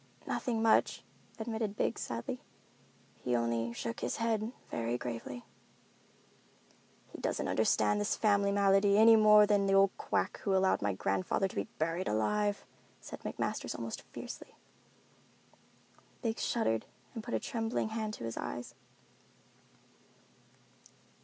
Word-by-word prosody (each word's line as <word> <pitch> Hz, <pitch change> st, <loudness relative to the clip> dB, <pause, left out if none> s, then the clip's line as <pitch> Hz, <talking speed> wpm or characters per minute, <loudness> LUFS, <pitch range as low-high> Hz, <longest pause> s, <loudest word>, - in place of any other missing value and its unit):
"Nothing 230 Hz, -4 st, -1 dB
much," 225 Hz, -, +3 dB, 0.3 s
admitted 220 Hz, -2 st, -3 dB
Biggs, 220 Hz, -, -1 dB
sadly. 115 Hz, 0 st, -4 dB, 0.8 s
"He 125 Hz, -, -1 dB
only 115 Hz, 0 st, 0 dB
shook 115 Hz, -1 st, -4 dB
his -, -, -2 dB
head 225 Hz, -1 st, 0 dB, 0.2 s
very 115 Hz, +1 st, -1 dB
gravely." 120 Hz, 0 st, -6 dB, 1.7 s
"He -, -, -9 dB
doesn't -, -, -1 dB
understand 105 Hz, -1 st, +2 dB
this 105 Hz, -, 0 dB
family 200 Hz, -2 st, +2 dB
malady 200 Hz, 0 st, +4 dB
any 225 Hz, +1 st, +8 dB
more 210 Hz, -1 st, +7 dB
than 200 Hz, -1 st, +2 dB
the 195 Hz, -, +3 dB
old 195 Hz, 0 st, +5 dB
quack -, -, -1 dB
who 195 Hz, -2 st, 0 dB
allowed 190 Hz, 0 st, +3 dB
my 100 Hz, 0 st, +1 dB
grandfather 95 Hz, -, 0 dB
to -, -, -12 dB
be 100 Hz, -, -2 dB
buried 165 Hz, +4 st, -1 dB
alive," 205 Hz, -, 0 dB, 0.3 s
said -, -, -9 dB
McMasters -, -, -3 dB
almost -, -, -5 dB
fiercely. -, -, -8 dB, 1.7 s
Biggs 225 Hz, -1 st, -1 dB
shuddered 115 Hz, -, 0 dB, 0.3 s
and 225 Hz, -, -6 dB
put 240 Hz, -, -3 dB
a -, -, +1 dB
trembling 225 Hz, -3 st, -2 dB
hand 220 Hz, -1 st, -3 dB
to -, -, -9 dB
his 115 Hz, 0 st, -4 dB
eyes. 120 Hz, 0 st, -5 dB
195 Hz, 130 wpm, -32 LUFS, -, 1.7 s, any